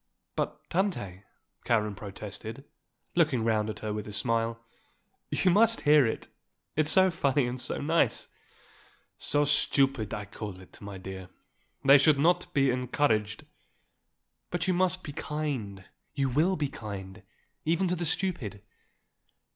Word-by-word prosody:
"But, - - -3
Tante," 105 - -2 0.4
Karen 105 -3 +1
protested, 105 +4 -7 0.5
looking 155 -9 +2
round 110 -1 +1
at 105 - -6
her 110 -1 -3
with 105 0 -5
a - - -6
smile, 115 +1 0 0.7
"you 185 - +2
must 230 +4 +4
hear 150 -4 +5
it; 110 - -4 0.5
it 155 0 +2
is - - +5
so 190 -1 +5
funny 140 -5 +1
and 120 +1 -3
so - - -1
nice." 160 +4 +1 0.9
"So 145 0 +2
stupid 135 -5 +2
I 105 -2 -4
call 100 -2 -7
it, 95 - -15
my 100 -1 -7
dear. 95 0 -8 0.6
They 140 +1 +8
should 145 +1 +5
not 175 +4 +2
be 135 -4 +3
encouraged." 120 -4 0 1.0
"But 175 +1 -2
you 185 - +3
must 185 +1 +1
be 145 - -7
kind, 130 -12 -4 0.3
you 135 -1 +1
will 160 +9 +2
be 145 -4 -1
kind, 100 -4 -8 0.4
even 170 +4 +1
to 180 - 0
the 175 - -3
stupid. 125 - -1
130 Hz, 145 wpm, -29 LUFS, 105-155 Hz, 1.0 s, They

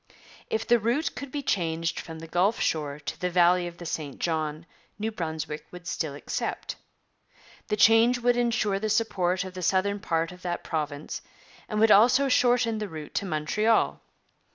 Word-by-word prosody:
If 220 0 -1
the 240 0 +4
route 240 +9 0
could 280 0 -7
be 285 0 -3
changed 165 -6 -1
from 160 -1 -8
the 165 +1 -9
Gulf 185 +7 +1
shore 150 -2 -1
to 140 - -6
the 180 - 0
valley 175 0 +4
of 170 0 -9
the 175 - -9
St 150 -4 -4
John, 155 -1 -2 0.3
New 220 +2 -2
Brunswick 160 -5 -5
would 180 0 -11
still 155 -5 -3
accept. 145 - -4 0.9
The 210 - -1
change 225 +3 +6
would 245 0 +2
ensure 230 -4 +1
the 215 +1 -2
support 190 -4 +1
of 185 -1 -8
the 185 - -6
southern 195 +3 +1
part 165 -2 -1
of 180 0 -13
that 175 -1 -3
province, 150 -2 -4 0.5
and 215 - -1
would 220 0 +5
also 250 +7 +6
shorten 245 -3 +3
the 210 -2 -4
route 155 -2 -8
to - - -1
Montreal. 200 +8 +1
185 Hz, 175 wpm, -27 LUFS, 165-225 Hz, 0.9 s, change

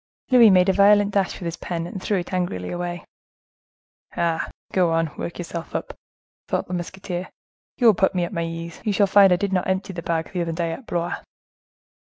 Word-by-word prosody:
Louis 240 -3 +8
made 185 -1 +5
a 190 - +4
violent 205 +1 +5
dash 195 -1 +1
with 180 - -8
his 170 0 -3
pen, 170 -2 -4
and 185 +2 -7
threw 200 +1 0
it 180 +1 -5
angrily 175 - -2
away. 175 0 -4 1.1
"Ah! 170 -1 0 0.2
go 180 -3 +3
on, 165 -1 0
work 170 - -5
yourself 170 -1 -6
up!" - - -4 0.5
thought - - -1
the 180 - -6
musketeer; 180 +1 -5 0.5
"you 245 - 0
will 225 - +8
put 190 +1 +1
me 180 - +1
at 170 - -8
my 170 -2 -1
ease. 165 0 -6
You 215 -3 0
shall 200 +1 +4
find 195 -1 +6
I - - +6
did 195 +1 -2
not 185 - +1
empty 190 +1 -1
the 170 - -5
bag, 165 -1 -2
the 180 - -1
other 165 -1 -2
day, 165 0 -2
at 230 +9 -8
Blois." 170 0 -2
180 Hz, 210 wpm, -23 LUFS, 170-195 Hz, 1.1 s, Louis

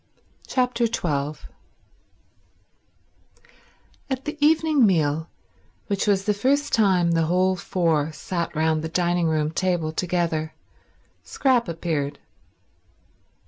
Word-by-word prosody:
Chapter 250 -2 +1
12 150 -9 -3 2.6
At 265 0 -3
the 300 +1 -4
evening 310 -2 +4
meal, 160 -5 +2 0.6
which 200 0 -1
was 195 -1 +2
the 210 - +2
first 280 +8 0
time 185 -6 +3
the 165 -1 +1
whole 185 +2 +2
four 165 -4 0
sat 170 +2 -4
round 160 0 +1
the 160 - -4
dining 175 0 +1
room 155 -1 0
table 175 -2 -1
together, 165 -2 -2 0.7
Scrap 255 -5 +1
appeared. 155 -4 -3
175 Hz, 100 wpm, -23 LUFS, 160-215 Hz, 2.6 s, evening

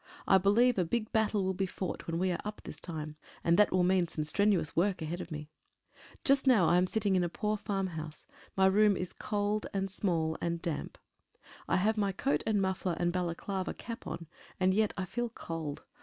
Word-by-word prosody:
I 190 - +6
believe 220 +4 +4
a - - +4
big 215 +6 -2
battle 215 -2 +2
will 190 0 0
be 190 +1 -1
fought 185 0 -5
when 165 0 -1
we 185 +1 +1
are 170 - -2
up 210 0 -6
this - - -8
time, 155 -3 -6 0.3
and 170 - +4
that 210 - +5
will 185 -1 +3
mean 180 -1 +3
some 155 -1 -3
strenuous 195 +1 +1
work 185 +3 +2
ahead 170 +3 -3
of - - -8
me. 150 -1 -7 0.7
Just 275 0 +3
now 225 -9 +6
I 175 - +5
am 180 +1 +3
sitting 205 -1 +1
in 180 - +3
a 175 - 0
poor 210 +4 -1
farmhouse. 185 -7 -4 0.3
My 190 - +5
room 205 +1 +5
is 180 - -3
small 210 0 -1
and 195 -1 -2
cold 165 -5 +1
and 170 0 -1
damp. 165 -3 -4 0.7
I - - +2
have 215 +4 +2
my 200 -2 +1
coat 270 +8 0
and 215 -2 +2
muffler 190 -2 0
and 175 0 0
Balaclava 185 +2 -2
cap 230 0 -7
on, 170 - -5 0.3
and 185 0 +3
yet 215 +1 +2
I 190 - -1
feel 240 +5 -2
cold. 165 -8 -6
190 Hz, 210 wpm, -31 LUFS, 170-210 Hz, 0.7 s, I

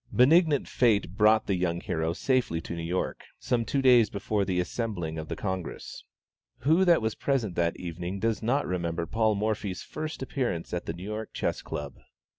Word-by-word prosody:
Benignant 150 +3 +4
fate 110 -7 +2
brought 110 +1 +4
the 100 - 0
young 90 -2 0
hero 80 -1 -1
safely 125 -6 +1
to 85 - -6
New 85 - -4
York, 85 +3 -2
some 120 -2 0
two 135 +4 -1
days 120 -5 +6
before 100 +1 -1
the 95 -2 0
assembling 90 -5 -3
of 80 - -6
the - - -4
Congress. 95 -3 -5 0.6
Who 160 +8 +4
that 170 -8 +4
was 110 0 0
present 125 -9 -1
that 85 -1 +1
evening 90 +2 -5
does 110 0 0
not 130 +6 +1
remember 85 -2 -2
Paul 110 +2 +1
Morphy's 105 -2 -2
first 155 -3 -5
appearance 125 -11 -2
at 90 - -3
the - - -2
New 90 - -9
York 105 +2 -5
Chess - - -2
Club? 70 -2 -6
105 Hz, 185 wpm, -28 LUFS, 85-120 Hz, 0.6 s, days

